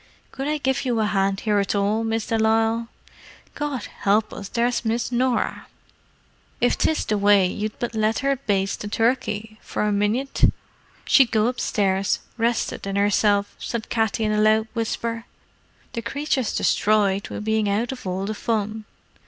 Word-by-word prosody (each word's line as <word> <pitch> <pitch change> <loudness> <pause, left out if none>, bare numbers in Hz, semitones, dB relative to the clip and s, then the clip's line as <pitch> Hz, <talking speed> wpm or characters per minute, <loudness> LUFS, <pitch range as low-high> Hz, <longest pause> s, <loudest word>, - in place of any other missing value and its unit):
Could 270 +1 -4
I 305 0 0
give 265 -2 0
you 245 -3 0
a 215 - +2
hand 195 -1 0
here 210 -2 +2
at 200 +1 0
all, 205 +3 +1
Miss 225 0 -1
de 225 - 0
Lisle? 225 +1 +2 0.7
God 290 -6 -3 0.2
help 210 +2 +2
us, 200 -1 -7
there's 240 0 0
Miss 230 +2 -1
Norah!" 250 0 0 0.9
"If - - +3
'tis 315 - +1
the 210 -1 0
way 200 -1 +5
you'd 210 +3 -3
but 240 - -3
let 220 0 +1
her 275 0 +3
baste 195 -6 -1
the 210 - -4
turkey 220 -1 -1
for - - -3
a - - +1
minyit, 210 +7 +2 0.5
she'd 265 -4 +5
go 215 -2 +2
upstairs 195 -5 +1 0.2
reshted 230 -3 -1
in 195 - -3
hersilf," 205 0 +2
said 235 -2 -4
Katty 225 0 0
in 215 - +1
a 210 0 +2
loud 215 +1 +3
whisper. 230 0 -3 0.7
"The 230 - -3
creature's 265 0 -1
destroyed 200 -2 +2
with 210 - -6
bein' 220 -1 +1
out 215 +5 0
of 255 -7 -7
all 185 +1 -2
the 215 - -2
fun." 215 0 -2
220 Hz, 170 wpm, -23 LUFS, 205-235 Hz, 0.9 s, way